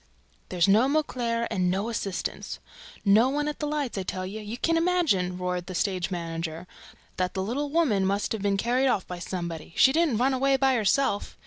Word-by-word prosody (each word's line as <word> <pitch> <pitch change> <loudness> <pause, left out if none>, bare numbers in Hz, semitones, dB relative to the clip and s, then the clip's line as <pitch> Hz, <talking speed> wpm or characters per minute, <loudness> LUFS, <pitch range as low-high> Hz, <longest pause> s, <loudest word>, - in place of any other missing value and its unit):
"There's 180 -1 +2
no 215 +6 +5
Mauclair 245 -6 0
and 180 -1 +1
no 195 +4 -1
assistants! 205 -5 -4 0.5
No 215 +5 +5
one 295 +2 -1
at 300 - -4
the 300 - -2
lights, 290 -8 -2
I - - -1
tell 185 0 -4
you! 200 +4 -6
You 215 +2 -6
can 330 +6 +1
imagine," 330 - +1
roared 180 -1 -3
the 185 - -6
stage 185 -2 0
manager, 165 -1 -4 0.5
"that 185 +1 -1
that - - -2
little 260 +9 -2
girl 330 +3 +3
must 195 +2 0
have 220 - -2
been 200 0 +1
carried 245 +5 +1
off 200 -7 +1
by 180 -1 -7
somebody 170 -3 -5
else: - - -19
she 265 - +6
didn't 320 -7 +2
run 260 +3 +2
away 270 +1 +2
by 265 0 +3
herself! 220 -1 +1
210 Hz, 205 wpm, -26 LUFS, 185-270 Hz, 0.5 s, she